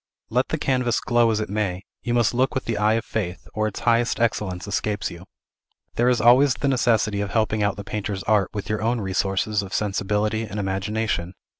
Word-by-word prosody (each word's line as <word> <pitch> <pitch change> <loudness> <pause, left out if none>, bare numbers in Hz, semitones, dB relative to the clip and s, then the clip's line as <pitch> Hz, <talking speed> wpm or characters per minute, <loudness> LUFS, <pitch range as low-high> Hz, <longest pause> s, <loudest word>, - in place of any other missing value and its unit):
Let - - +2
the - - -1
canvas 125 -3 +1
glow 120 -1 +3
as 110 -1 +1
it 105 - -2
may, 100 -3 -2 0.2
you 120 -1 -1
must 120 -1 +3
look 130 +4 +1
with 130 - -2
the 115 - -1
eye 105 +1 +3
of 115 0 -1
faith, 95 -5 -4
or 110 0 0
its 105 - -6
highest 120 0 +2
excellence 105 -5 -1
escapes 100 +1 -2
you. 85 +1 -10 0.7
There 120 +1 +2
is 125 -2 +2
always 130 +3 +5
the 140 - -2
necessity 115 -5 +2
of 100 - -2
helping 110 -1 0
out 100 -1 +1
the 100 - -7
painter's 100 -1 -4
art 105 -3 +2
with 100 -2 -5
your 105 +1 -1
own 115 +2 +1
resources 95 +1 0
of 100 -1 -6
sensibility 105 +1 0
and 105 -2 -5
imagination. 95 -2 -2
105 Hz, 205 wpm, -23 LUFS, 100-115 Hz, 0.7 s, always